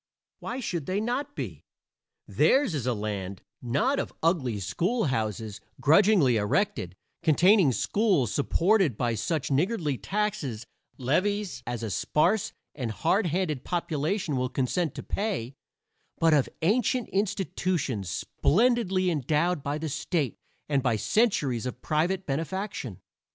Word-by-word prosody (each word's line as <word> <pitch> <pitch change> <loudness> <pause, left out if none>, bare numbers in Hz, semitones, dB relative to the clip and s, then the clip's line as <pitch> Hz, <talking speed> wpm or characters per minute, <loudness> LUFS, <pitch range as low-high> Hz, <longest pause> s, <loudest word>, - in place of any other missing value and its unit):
Why 250 - -5
should 170 - -3
they 190 +2 0
not 265 +6 -2
be? - - -6 0.6
Theirs 270 - +3
is 135 -5 -2
a 125 - +2
land, 100 -3 -4 0.2
not 225 - +1
of - - -3
ugly 140 - +1
schoolhouses 110 - -1 0.2
grudgingly 160 - +5
erected, 105 - 0 0.3
containing 175 +1 +5
schools 175 - +1
supported 170 - +2
by 120 -2 0
such 130 +7 -2
niggardly 155 - 0
tax 210 -1 -1 0.5
levies 185 - 0
as 120 -1 -3
a 110 - -3
sparse 180 - +1 0.2
and 125 -5 -4
hard 185 - +1
handed 160 -5 -1
population 165 -1 -1
will 125 0 0
consent 140 +5 -1
to - - -6
pay, 190 - -2 0.6
but 165 -1 +4
of 145 -4 +3
ancient 250 - +2
institutions 185 - -1
splendidly 195 - +1
endowed 155 +3 +1
by 145 +2 -2
the 160 +1 -4
state 150 - -1 0.3
and 140 -2 +1
by 120 -3 +1
centuries 135 - +1
of 125 - -6
private 175 +5 0
benefaction. 160 - -3
160 Hz, 125 wpm, -27 LUFS, 125-200 Hz, 0.6 s, grudgingly